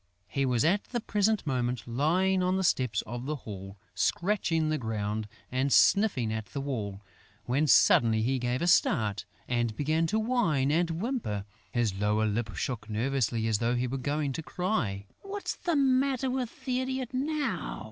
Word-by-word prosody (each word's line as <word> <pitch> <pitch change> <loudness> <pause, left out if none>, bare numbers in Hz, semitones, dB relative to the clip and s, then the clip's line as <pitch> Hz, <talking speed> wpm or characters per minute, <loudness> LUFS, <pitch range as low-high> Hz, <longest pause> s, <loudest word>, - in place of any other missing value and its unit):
He 135 +6 0
was 125 +1 +2
at 195 +5 +2
the 240 - -3
present 215 -2 +1
moment 125 -4 -1
lying 175 +10 +2
on 185 +1 +1
the 190 - 0
steps 125 - +1
of 120 +3 -6
the 155 - -1
hall, 100 -6 -9 0.2
scratching 170 -5 +1
the 155 -1 0
ground 110 -2 -2 0.2
and 130 +2 0
sniffing 160 - +4
at 110 -1 -4
the 140 - -5
wall, 105 -8 -4 0.4
when 140 +5 +1
suddenly 110 -4 +5
he 130 +2 +1
gave 125 +4 -1
a - - +2
start 110 - +2 0.2
and 120 -3 0
began 155 +4 +1
to 215 - 0
whine 215 - +1
and 170 +2 +2
whimper! 165 - -2 0.3
His 120 -5 +1
lower 105 +2 +1
lip 110 +1 -2
shook 115 -4 -4
nervously 115 0 0
as 110 -2 +1
though 120 +1 +1
he 125 +1 0
were 130 +2 -3
going 145 +1 -1
to 160 - -4
cry. 150 - -2 0.2
"What's 400 +1 -4
the 345 -3 -1
matter 265 -1 +2
with 260 0 -4
the 255 -1 0
idiot 260 -1 -3
now?" 275 - -2
135 Hz, 175 wpm, -29 LUFS, -, 0.4 s, suddenly